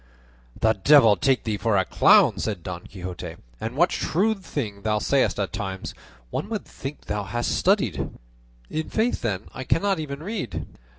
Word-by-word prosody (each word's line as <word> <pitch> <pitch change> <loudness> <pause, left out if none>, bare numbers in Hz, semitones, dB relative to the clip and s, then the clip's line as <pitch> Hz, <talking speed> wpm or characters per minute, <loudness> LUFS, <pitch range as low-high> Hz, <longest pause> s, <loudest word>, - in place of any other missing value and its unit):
"The 110 0 +4
devil 110 +1 +6
take 130 +7 +2
thee 110 -2 -1
for 100 +1 +1
a 95 - +2
clown!" - - +5
said 100 -6 -3
Don 90 -1 -6
Quixote, 90 -2 -7 0.2
"and 115 +3 -4
what 175 +5 +4
shrewd 195 +4 0
things 105 - -4
thou 105 +1 +1
sayest 130 +1 +1
at 95 -4 -2
times! 95 -2 -4 0.4
One 205 - -3
would 215 -3 -3
think 135 +2 -7
thou 105 0 -3
hadst 120 +5 -2
studied." 180 - +1 0.6
"In 155 +1 -2
faith, 230 +2 0
then, 100 -4 -1
I 130 - -5
cannot 195 +6 +1
even 145 -1 -5
read." 125 - -4
115 Hz, 170 wpm, -25 LUFS, 100-155 Hz, 0.6 s, devil